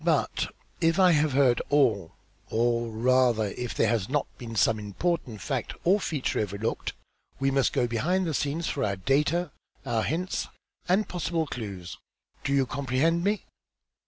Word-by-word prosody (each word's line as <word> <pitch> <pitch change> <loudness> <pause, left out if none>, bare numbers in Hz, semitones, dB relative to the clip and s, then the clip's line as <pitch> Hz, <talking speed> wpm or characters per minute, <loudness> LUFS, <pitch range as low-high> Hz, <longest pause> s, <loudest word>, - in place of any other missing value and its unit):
But, - - +1 0.3
if 165 0 +2
I 185 -1 +7
have 150 -3 +2
heard 130 -3 +4
all, 110 - +2 0.3
or, 115 0 +1
rather, 120 -1 +2
if 125 -1 -4
there 115 - +3
has 110 -4 0
not 145 +1 +1
been 115 -3 -7
some 110 0 +3
important 110 - -2
fact - - -2
or 190 +4 +4
feature 150 -8 -1
overlooked, 105 +2 -2 0.5
we 135 0 +2
must 135 -1 +2
go 130 -4 +1
behind 155 +11 0
the 160 - -1
scenes 150 +4 -1
for 140 - -1
our 100 -3 0
data, 145 - +1 0.3
our 115 -3 0
hints 175 +8 -2 0.4
and 190 +2 +3
possible 170 -2 -1
clues. 100 - -6 0.4
Do - - -1
you 140 -1 +3
comprehend 140 +6 0
me?" 205 +1 0
135 Hz, 160 wpm, -27 LUFS, 115-165 Hz, 0.5 s, I